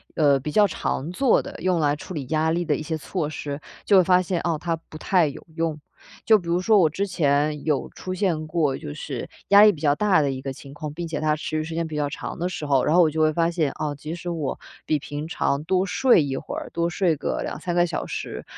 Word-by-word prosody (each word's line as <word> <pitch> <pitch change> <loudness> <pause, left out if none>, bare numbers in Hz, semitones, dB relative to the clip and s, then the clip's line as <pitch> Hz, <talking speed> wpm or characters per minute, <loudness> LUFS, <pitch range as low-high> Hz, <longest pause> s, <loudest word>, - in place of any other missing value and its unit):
呃， 145 -4 +4
比 150 +3 -5
较 210 +5 +5
常 160 -5 -2
做 255 +6 +3
的， - - -9
用 180 -2 +1
来 145 -2 +2
处 150 - -9
理 145 -5 -4
压 160 +2 +1
力 175 +2 0
的 155 -3 +1
一 155 - -5
些 160 +1 -3
措 155 0 -3
施， 145 -1 -5 0.3
就 200 - +5
会 185 - +7
发 180 +1 +4
现， 180 -1 -2
哦， 170 -2 0
它 170 -1 -1
不 160 -1 -13
太 175 0 +2
有 140 - -8
用。 165 -2 -1 0.5
就 220 -2 +6
比 175 - -11
如 170 +1 +1
说 210 +3 +4
我 165 -4 +5
之 190 +6 -2
前 150 -4 +1
有 150 -3 0
出 185 - -7
现 170 -5 -1
过， 155 -4 +1
就 75 - -7
是 - - -6 0.2
压 200 0 +8
力 210 0 +8
比 160 - -9
较 145 -2 +3
大 195 +1 +3
的 140 -2 +1
一 130 - -5
个 135 0 -4
情 135 +1 -11
况， 150 +1 -6
并 170 +1 -4
且 160 -2 -3
它 155 0 +1
持 155 - -6
续 155 0 0
时 160 +1 -6
间 165 0 -1
比 155 - -6
较 145 -1 0
长 150 - -6
的 175 +2 -1
时 160 -4 -5
候， 135 -3 +3
然 155 - +2
后 180 - +7
我 160 - +3
就 155 +1 -1
会 155 0 +4
发 165 +1 +1
现， 160 -5 0
哦， 150 -1 -2
即 150 +4 -6
使 175 - -9
我 160 -5 -3 0.3
比 155 - +2
平 145 +1 -6
常 145 -3 -1
多 185 +3 +1
睡 195 - +4
一 135 -2 -3
会 - - -5
儿， - - -6
多 170 0 0
睡 175 -2 +1
个 - - -3
2-3 175 +2 -4
个 175 0 +4
小 170 - -4
时， - - -5
160 Hz, 285 characters per minute, -24 LUFS, 150-175 Hz, 0.5 s, 压